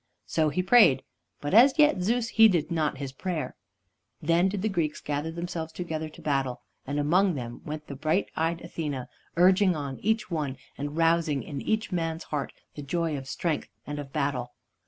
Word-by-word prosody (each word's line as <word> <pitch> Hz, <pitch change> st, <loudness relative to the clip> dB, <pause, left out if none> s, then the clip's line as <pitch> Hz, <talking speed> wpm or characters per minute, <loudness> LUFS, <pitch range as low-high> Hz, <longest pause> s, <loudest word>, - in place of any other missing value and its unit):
So 155 Hz, -2 st, +1 dB
he 185 Hz, +5 st, -1 dB
prayed, 185 Hz, -, +6 dB, 0.4 s
but 145 Hz, +4 st, -3 dB
as 255 Hz, +7 st, +7 dB
yet 295 Hz, -, +5 dB
Zeus 230 Hz, +4 st, +1 dB
heeded 195 Hz, -9 st, +5 dB
not 155 Hz, -4 st, 0 dB
his 135 Hz, -1 st, -5 dB
prayer. 165 Hz, +3 st, -4 dB, 0.6 s
Then 170 Hz, +4 st, +3 dB
did 195 Hz, 0 st, -3 dB
the -, -, +2 dB
Greeks 165 Hz, -7 st, -1 dB
gather 145 Hz, +2 st, -2 dB
themselves 170 Hz, -1 st, -4 dB
together 160 Hz, -2 st, -4 dB
to 155 Hz, -, -15 dB
battle, 135 Hz, -4 st, -1 dB, 0.2 s
and 145 Hz, +1 st, -2 dB
among 175 Hz, +5 st, +3 dB
them 120 Hz, -3 st, -6 dB
went 150 Hz, 0 st, -5 dB
the -, -, -7 dB
bright 155 Hz, +7 st, +1 dB
eyed 165 Hz, +1 st, 0 dB
Athene, 150 Hz, -6 st, -4 dB, 0.3 s
urging 185 Hz, +1 st, +5 dB
on 140 Hz, -3 st, -5 dB
each 220 Hz, -1 st, 0 dB
one, 145 Hz, -5 st, -2 dB, 0.2 s
and 145 Hz, +2 st, -5 dB
rousing 165 Hz, -4 st, +2 dB
in 140 Hz, +1 st, -5 dB
each 220 Hz, -1 st, -1 dB
man's 165 Hz, -2 st, -2 dB
heart 145 Hz, -2 st, -3 dB, 0.2 s
the 145 Hz, -, -7 dB
joy 165 Hz, +2 st, -1 dB
of 135 Hz, -1 st, -6 dB
strength 160 Hz, +3 st, -2 dB, 0.2 s
and 145 Hz, 0 st, -5 dB
of 140 Hz, -2 st, -7 dB
battle. 135 Hz, -5 st, -1 dB
160 Hz, 180 wpm, -27 LUFS, 145-180 Hz, 0.6 s, as